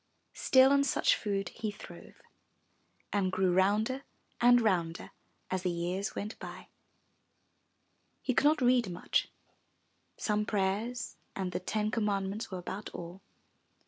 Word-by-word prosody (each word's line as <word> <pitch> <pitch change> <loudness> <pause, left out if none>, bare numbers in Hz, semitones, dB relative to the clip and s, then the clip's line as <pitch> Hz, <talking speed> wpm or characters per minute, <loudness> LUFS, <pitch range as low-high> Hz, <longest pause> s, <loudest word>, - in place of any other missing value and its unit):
Still 260 +1 +5
on 280 0 +5
such 280 - +3
food 195 -3 -2
he 220 - -4
throve 205 - -12 0.9
and 195 -2 +1
grew 185 -1 +2
rounder 210 +8 +2 0.4
and 245 0 +7
rounder 175 -7 0 0.4
as 185 -1 0
the 185 - 0
years 175 +3 -2
went 210 +3 -5
by. - - -9 1.5
He 255 - +1
could 280 - +2
not 300 -1 +4
read 245 -4 +4
much 175 0 0 0.5
— - - -44
some 210 -1 0
prayers 210 +4 -1 0.2
and 190 -2 -2
the - - -2
ten 210 +3 -1
com 225 -2 0
mandments 200 +2 -2
were 185 - -5
about 190 +3 -6
all. 175 +2 -8
205 Hz, 140 wpm, -31 LUFS, 185-230 Hz, 1.5 s, and